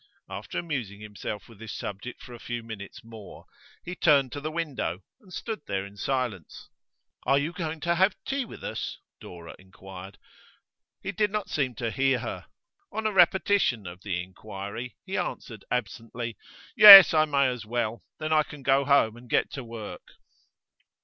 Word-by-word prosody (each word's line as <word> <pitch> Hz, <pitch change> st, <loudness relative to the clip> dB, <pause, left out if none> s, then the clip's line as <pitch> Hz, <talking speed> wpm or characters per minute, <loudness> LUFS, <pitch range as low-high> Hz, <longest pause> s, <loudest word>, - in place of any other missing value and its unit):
After -, -, -7 dB
amusing 125 Hz, -, -4 dB
himself 105 Hz, -1 st, -7 dB
with 115 Hz, -4 st, -17 dB
this 110 Hz, -2 st, -7 dB
subject 105 Hz, +5 st, -7 dB
for 125 Hz, -, -11 dB
a 120 Hz, -, -10 dB
few 120 Hz, 0 st, -5 dB
minutes 110 Hz, -1 st, -9 dB
more, 110 Hz, -3 st, -12 dB, 0.4 s
he 175 Hz, -, -5 dB
turned 140 Hz, -7 st, +3 dB
to 145 Hz, -, -6 dB
the 155 Hz, -, -3 dB
window 150 Hz, -, -3 dB, 0.2 s
and 190 Hz, -, -20 dB
stood 220 Hz, +4 st, -5 dB
there 95 Hz, 0 st, -2 dB
in 100 Hz, +1 st, -13 dB
silence. 120 Hz, -, -4 dB, 0.6 s
'Are 135 Hz, -, +4 dB
you 150 Hz, +4 st, -1 dB
going 160 Hz, -2 st, -4 dB
to 170 Hz, +2 st, +1 dB
have 190 Hz, +3 st, +3 dB
tea 275 Hz, 0 st, -1 dB
with 235 Hz, -, -12 dB
us?' -, -, -5 dB, 0.2 s
Dora 85 Hz, -1 st, -11 dB
inquired. 95 Hz, 0 st, -12 dB, 0.9 s
He -, -, -3 dB
did 210 Hz, -1 st, 0 dB
not 210 Hz, -1 st, -4 dB
seem 130 Hz, -5 st, -1 dB
to 115 Hz, -2 st, -3 dB
hear 135 Hz, +3 st, +2 dB
her. 120 Hz, -, -6 dB, 0.4 s
On 220 Hz, 0 st, -4 dB
a 215 Hz, -, +2 dB
repetition 180 Hz, -, +3 dB
of 90 Hz, +1 st, -9 dB
the 90 Hz, -3 st, -3 dB
inquiry, 100 Hz, +4 st, -8 dB
he -, -, -4 dB
answered -, -, -6 dB
absently: 120 Hz, -1 st, -4 dB, 0.4 s
'Yes, 195 Hz, -4 st, +12 dB
I 155 Hz, -1 st, +4 dB
may 140 Hz, -3 st, +2 dB
as 120 Hz, -3 st, -6 dB
well. 115 Hz, -2 st, -2 dB
Then 155 Hz, 0 st, -2 dB
I 155 Hz, -, +5 dB
can 150 Hz, -2 st, -9 dB
go 135 Hz, +1 st, +3 dB
home 140 Hz, -6 st, +3 dB
and 120 Hz, 0 st, -15 dB
get -, -, +1 dB
to 135 Hz, -, -6 dB
work. 115 Hz, -3 st, -9 dB
125 Hz, 175 wpm, -27 LUFS, 105-155 Hz, 0.9 s, Yes